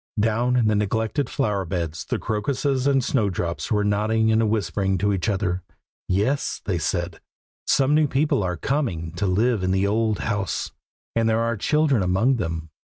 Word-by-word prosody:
Down 115 +4 +1
in 120 -3 +3
the 110 - +3
neglected 110 +6 0
flower 100 -2 0
beds 85 -3 -4
the - - -1
crocuses 130 +5 -1
and 135 -2 +3
snowdrops 95 -9 -1
were 105 -1 +2
nodding 110 +2 +2
and 110 -1 +3
whispering 100 -3 0
to 105 +2 +1
each 95 +2 -1
other. 95 -3 -1 0.5
"Yes," 105 +10 0
they 90 -4 -1
said, 85 +2 -2 0.5
"some 140 +1 +3
new 155 0 +4
people 140 -3 +1
are 90 -2 -2
coming 90 - -2
to 90 +4 -2
live 110 +4 +2
in 90 - 0
the 95 +1 +2
old 110 +1 +1
house, 105 -4 -2 0.4
and 115 -1 +2
there 110 +1 +2
are 115 0 0
children 145 +2 +2
among 95 +9 +2
them. 80 -5 -3
Mr. - - -73
105 Hz, 175 wpm, -23 LUFS, 95-120 Hz, 0.5 s, new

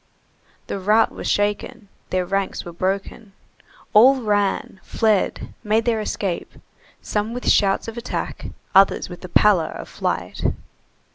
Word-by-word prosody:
The 200 - -4
rout 215 +4 +3
was - - -6
shaken, 205 0 -1 0.2
their 185 -1 0
ranks 195 +1 -2
were 175 - -8
broken, 195 +3 -3 0.6
all 260 +5 +7
ran, 205 -2 0
fled, 215 -4 0
made 220 +1 +1
their 230 -2 +1
escape, 195 -4 -3 0.5
some 215 +3 -2
with 250 - -5
shouts 195 +1 +3
of 225 +1 -5
attack, 235 - -5 0.3
others 195 -1 +4
with 175 - -9
the 185 - -8
pallor 190 -3 +4
of - - -8
flight. - - -3
205 Hz, 135 wpm, -22 LUFS, 195-220 Hz, 0.6 s, all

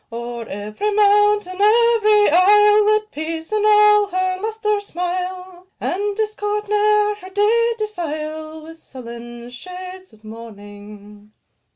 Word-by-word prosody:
O'er 235 0 -7
every 210 - -4
mountain, 415 -2 +2
every 430 -1 +4
isle, 415 +4 +5
Let 430 0 +1
peace 320 +2 -6
in 425 -1 0
all 420 -1 +5
her 370 -1 -2
lustre 430 -1 -2
smile, 365 -1 -6
And 405 +2 -3
discord 420 -1 -3
ne'er 420 0 +2
her 370 -2 -12
day 450 +4 +1
defile 315 -6 -6
With 325 +1 -12
sullen 240 -2 -11
shades 365 +6 -10
of 220 0 -23
mourning. 210 -1 -13
370 Hz, 115 wpm, -19 LUFS, 305-420 Hz, -, isle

